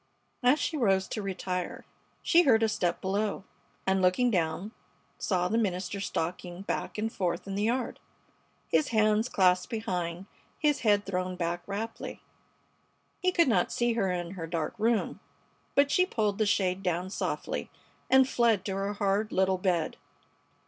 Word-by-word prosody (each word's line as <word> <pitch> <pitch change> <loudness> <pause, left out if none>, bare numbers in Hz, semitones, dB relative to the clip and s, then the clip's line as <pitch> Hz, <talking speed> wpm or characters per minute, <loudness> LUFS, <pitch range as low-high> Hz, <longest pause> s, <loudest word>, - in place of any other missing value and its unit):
As 250 +4 +5
she 310 - -1
rose 195 -7 +2
to 215 - -3
retire 185 -2 -4 0.4
she 345 - +6
heard 230 -8 +4
a - - +4
step 180 -5 -1
below, 200 +1 -1 0.4
and, 190 0 +2
looking 185 +7 +3
down, 175 +2 -1 0.5
saw 180 -3 +1
the 225 +5 +1
minister 190 -2 -2
stalking 180 0 -3
back - - -3
and 220 +1 -2
forth 175 -2 -2
in 195 - -5
the 200 - -1
yard, 245 +2 -1 0.7
his 300 - +2
hands 215 +1 +2
clasped 180 -1 +3
behind, 180 -6 -3 0.3
his 295 -2 +2
head 205 -3 +3
thrown 185 -1 -2
back 175 0 -2
raptly. 220 +3 -5 1.0
He 365 0 +3
could 340 -3 +4
not 235 - +2
see 240 0 +1
her 200 -5 +1
in 175 -1 -3
her 175 -4 -6
dark 165 -2 -2
room, 225 +1 +1 0.6
but 280 0 +4
she 365 0 +4
pulled 210 - 0
the 215 - +2
shade 190 -2 +1
down 180 0 -1
softly - - -3 0.4
and 265 0 +6
fled 230 -6 +2
to 195 - -2
her 195 +1 -2
hard 205 +1 0
little 190 0 +2
bed. 180 -3 0
195 Hz, 160 wpm, -29 LUFS, 180-225 Hz, 1.0 s, she